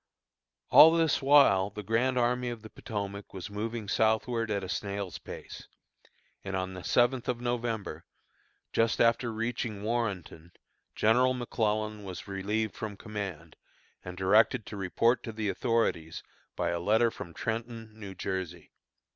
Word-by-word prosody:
All 160 - +10
this 165 -2 +2
while 135 -9 +5
the 105 +1 -8
Grand 125 +5 +1
Army 125 0 +1
of 115 -2 -7
the 110 - -11
Potomac 100 -1 -6
was 95 +2 -6
moving 110 +1 -4
southward 110 +2 +1
at 100 -2 -1
a - - -4
snail's 100 0 -4
pace; - - -9 0.8
and 95 -1 -4
on 95 0 -2
the 90 -1 -8
seventh 120 0 +2
of 120 -1 -1
November, 115 -8 -3 0.7
just 115 0 +2
after 115 0 +3
reaching 115 -2 -3
Warrenton, 100 -7 -3 0.4
General 125 +4 +3
McClellan 110 -3 -1
was 95 0 -7
relieved 105 +2 -2
from 105 -2 -6
command, 100 -7 -6 0.5
and 90 0 -8
directed 105 +4 +3
to - - -8
report 105 +5 +1
to 115 - -6
the 110 -2 -2
authorities 110 -9 -1 0.3
by 85 -1 -1
letter 110 +7 +2
from 85 - -8
Trenton, 115 +3 -4
New 100 -3 -9
Jersey. 90 -3 -4
110 Hz, 140 wpm, -29 LUFS, 95-115 Hz, 0.8 s, All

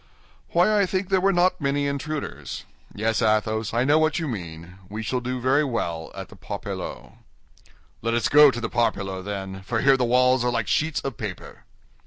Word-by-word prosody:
"Why, 205 +5 +3
I 200 - +3
think 185 0 -2
there 190 -1 +3
were 195 +1 +3
not 180 -1 +2
many 140 0 0
intruders. 140 +2 -4 0.3
Yes, 110 +2 -1
Athos, 110 0 +1
I 120 +2 +1
know 145 +4 +4
what 155 -2 +2
you 165 -2 -2
mean: 90 - -7
we 110 +2 -5
shall 115 +5 -1
do 125 +1 -3
very 130 +4 +3
well 85 - -3
at - - -7
the - - -13
Parpaillot." - - -7 0.8
"Let 115 +1 0
us 120 - +1
go 150 0 +8
to 120 - -3
the 115 - -2
Parpaillot, 100 -6 -1
then, 95 -2 -5
for 110 +3 -2
here 135 0 +5
the 125 - +1
walls 125 +1 +3
are 125 - +2
like 115 -3 -1
sheets 155 0 0
of 135 -5 -5
paper." - - -7
125 Hz, 195 wpm, -24 LUFS, 110-145 Hz, 0.8 s, go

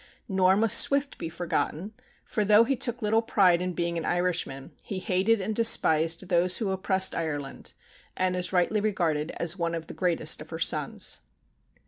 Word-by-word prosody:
Nor 190 -2 +2
must 220 0 +5
Swift 280 0 +2
be 165 - -5
forgotten, 175 +3 -3 0.3
for 215 - -2
though 210 +2 +5
he 270 +4 -1
took 245 -1 -2
little 220 +2 +2
pride 185 -6 +2
in 180 0 -3
being 170 -1 -2
an - - -6
Irishman, 175 -7 -2
he 195 - -6
hated 190 +4 +1
and 210 +3 -4
despised 165 -6 +3
those 180 0 +2
who 210 -5 -2
oppressed 190 0 0
Ireland, 145 -4 -5 0.4
and 185 0 0
is 180 0 -2
rightly 190 +3 +1
regarded 170 -8 -1
as 170 +2 0
one 170 0 -1
of 165 -1 -6
the - - -10
greatest 180 -3 -1
of - - -11
her - - -6
sons. - - 0
185 Hz, 175 wpm, -26 LUFS, 170-210 Hz, 0.4 s, must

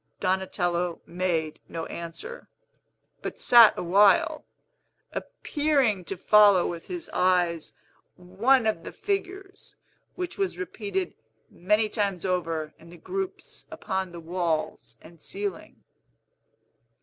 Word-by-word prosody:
Donatello 180 -2 -1
made 170 -3 -2
no 165 -1 -4
answer, 170 - -7 0.7
but - - -5
sat 235 -3 +7
awhile, 195 +3 +4 0.7
appearing 275 -10 0
to 195 - -5
follow 205 -1 +6
with 170 -1 -5
his 350 -2 -6
eyes 175 -3 +1 0.4
one 220 +8 +2
of 215 -6 0
the - - -8
figures, 390 0 -5 0.4
which 360 +2 -5
was 390 -2 -1
repeated 200 - -3 0.4
many 210 +5 +1
times 200 -5 -2
over 165 -4 -2
in 165 - -15
the 175 - -12
groups 385 - -6
upon 190 -1 -3
the 170 - -8
walls 160 -9 -3
and 165 -1 -16
ceiling. 400 0 -6
190 Hz, 110 wpm, -26 LUFS, 170-250 Hz, 0.7 s, sat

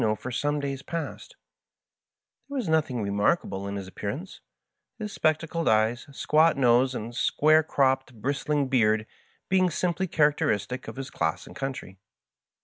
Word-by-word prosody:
Casmo 110 -1 +1
for 125 - -6
some 145 +4 0
days 140 -1 -3
past 165 -2 -6 1.1
Tliere 285 - -6
was 255 -8 -2
nothisg 145 -8 +1
remark 100 +11 +2
able 95 0 -5
in 100 - -4
his 100 -2 -5
appearance, 135 - -6 0.6
his 210 -3 -5
spectacled 160 +1 0
eyes, 110 +4 +2
squat 155 +3 +3
nose, 125 0 +4
and 115 +1 -5
square 155 +5 +4
cropped 135 -4 +1
bristling 140 +4 -1
beard 110 -4 +2 0.4
being 185 -1 +3
simply 180 +2 -1
charac 150 -3 +3
teristic 105 +5 -1
of - - -7
his 135 +1 -6
class 80 -1 -1
and - - -13
country. 130 -8 -5
135 Hz, 150 wpm, -27 LUFS, 110-155 Hz, 1.1 s, nose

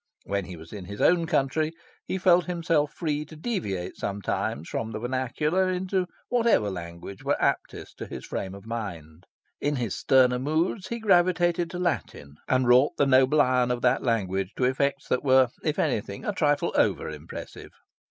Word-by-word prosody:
When 100 -1 -2
he 90 -1 -8
was 80 +1 -12
in 100 -3 -7
his 100 +2 -8
own 170 -1 +3
country 155 +1 +1 0.3
he - - -1
felt 180 -1 +4
himself 165 -4 0
free 150 -3 -2
to 155 - -13
deviate 150 - -3
sometimes 100 -5 -3
from 110 - -3
the 105 - -4
vernacular 130 +9 0
into 185 0 -1 0.2
whatever 230 - +2
language 85 +1 -8
were - - 0
aptest - - -2
to - - -5
his - - -8
frame 95 0 -4
of 100 +1 -12
mind. 90 -9 -6 0.3
In 145 +1 0
his 120 -7 -2
sterner 125 -2 +4
moods 160 - -1
he 235 - -3
gravitated 175 -4 +2
to 180 - -6
Latin, 145 - -3
and 130 -1 +2
wrought 125 +4 +5
the 145 - +4
noble 135 +2 +4
iron 125 -3 +3
of 125 0 -2
that 125 +1 +3
language 95 -5 -1
to - - -2
effects 135 +2 0
that 125 - +1
were, 130 -2 +5
if 155 -1 -1
anything, 100 -1 -1
a 210 - -1
trifle 145 -5 +1
over - - +2
impressive. 75 +1 -8
130 Hz, 175 wpm, -26 LUFS, 100-165 Hz, 0.3 s, wrought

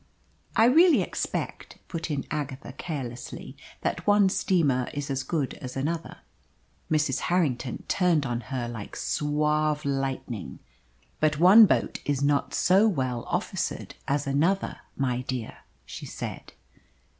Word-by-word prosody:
"I 225 - +6
really 325 +7 +6
expect," - - -4
put 165 -1 -4
in 140 -3 -2
Agatha 145 -3 -4
carelessly, 130 -7 -6 0.3
"that - - -2
one 205 -1 +5
steamer 145 -10 +1
is 145 0 -3
as 135 0 -1
good 140 0 -2
as 130 0 -6
another." 160 +5 -3 0.7
Mrs. 150 -4 +1
Harrington 140 -9 0
turned 175 -6 +2
on 120 -2 -2
her 130 -3 -2
like 115 -3 -7
suave 150 0 0
lightning. 135 -6 -3 0.6
"But 155 -1 +2
one 195 +7 +9
boat - - 0
is 140 -1 -1
not 140 0 +2
so 195 +4 +4
well 130 - -1
officered - - -2
as 140 +1 0
another, 160 +8 +1 0.2
my 125 -2 0
dear!" 130 -3 -5 0.3
she - - -8
said. - - -7
145 Hz, 130 wpm, -27 LUFS, 130-170 Hz, 0.7 s, one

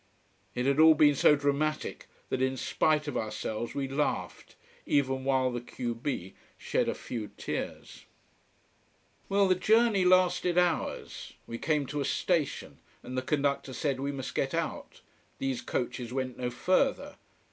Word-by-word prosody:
It 125 0 -1
had 140 +2 +2
all 160 0 +8
been 150 -1 +6
so 145 +2 +5
dramatic 145 +2 -1 0.2
that 130 - -1
in 130 0 +1
spite 155 +3 +1
of 145 - -3
ourselves 110 +1 -3
we 140 -1 -1
laughed, 140 +2 -3 0.3
even 135 -2 +1
while 130 -1 +2
the 120 -1 -4
q 120 0 -4
b 115 -6 -4 0.2
shed - - 0
a - - -2
few 115 -4 -5
tears. - - -5 1.2
Well, 200 0 +3
the 185 - +5
journey 215 +1 +3
lasted 180 -1 +3
hours. 175 -2 -1
We 115 - -6
came 150 -3 +1
to 145 +2 -3
a - - -1
station, 160 +1 -1 0.2
and 130 - -7
the 130 - 0
conductor 140 -1 -1
said 140 -1 -1
we 140 +1 -2
must 135 -2 -5
get - - -1
out: - - -4 0.4
these 135 -2 -2
coaches 125 -1 -3
went 130 -1 -3
no 125 -1 -2
further. 185 - 0
140 Hz, 155 wpm, -29 LUFS, 130-155 Hz, 1.2 s, all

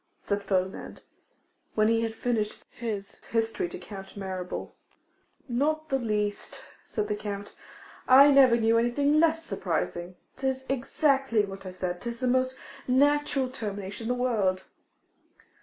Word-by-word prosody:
said 200 0 -2
Ferdinand, 190 -1 -2 0.7
when 215 0 +4
he 225 0 +3
had 225 -1 -2
finished 225 -3 -2
his 210 -4 -5
history 225 -6 -1
to - - -7
Count 195 +2 -10
Mirabel. 185 -2 -5 0.7
'Not 310 +5 0
the 270 -1 +1
least,' 210 -3 -2 0.2
said 210 -1 -3
the 210 - -1
Count, 205 -1 -6 0.5
'I 275 +3 +9
never 265 -4 +7
knew 230 0 +3
anything 280 +6 +2
less 325 0 +3
surprising. 175 - -2 0.2
'Tis 265 0 -2
exactly 270 -3 +2
what 195 -1 -9
I - - -5
said, 180 -1 -4
'tis 235 -1 -5
the 255 - -1
most 255 +1 +1 0.3
natural 280 +1 +3
termination 205 -3 -6
in 250 +2 0
the 245 - -1
world. 195 -7 +1
230 Hz, 140 wpm, -28 LUFS, 200-265 Hz, 0.7 s, I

